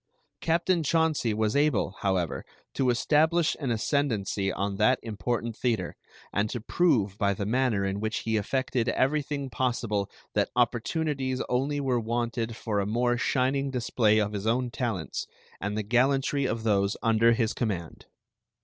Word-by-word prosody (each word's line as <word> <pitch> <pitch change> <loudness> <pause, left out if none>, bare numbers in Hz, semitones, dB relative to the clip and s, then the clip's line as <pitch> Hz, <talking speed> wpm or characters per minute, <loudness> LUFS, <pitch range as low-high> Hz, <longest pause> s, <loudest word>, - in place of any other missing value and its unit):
Captain 170 +1 +1
Chauncey 160 -5 +1
was 105 0 0
able, 145 -10 +2
however, 95 -5 -1 0.3
to 130 -2 +1
establish 160 +6 +2
an 140 -4 -2
ascendancy 110 -5 0
on 100 +1 -2
that 125 +5 +4
important 115 +1 -3
theater, 120 -2 -1 0.4
and 105 +1 +1
to 120 - -3
prove 115 - +1
by 100 -1 +2
the 100 - -3
manner 115 -3 +1
in 95 +1 -2
which 110 +1 -2
he 110 0 -1
effected 125 +2 0
everything 140 0 0
possible 115 -4 -1 0.2
that - - +1
opportunities 130 +3 0
only 140 +4 0
were 130 -3 +1
wanted 115 0 -2
for 110 -3 -2
a 100 - -1
more 120 +3 +1
shining 135 +3 +1
display 115 -4 +2
of 105 -1 0
his 100 +1 -3
own 125 +2 +1
talents 110 -8 -3 0.3
and 100 +2 -3
the 110 - -1
gallantry 135 +5 +2
of 115 -1 -3
those 100 -2 +1
under 115 0 +4
his 115 -1 0
command. 95 -9 -4
120 Hz, 150 wpm, -27 LUFS, 105-135 Hz, 0.4 s, that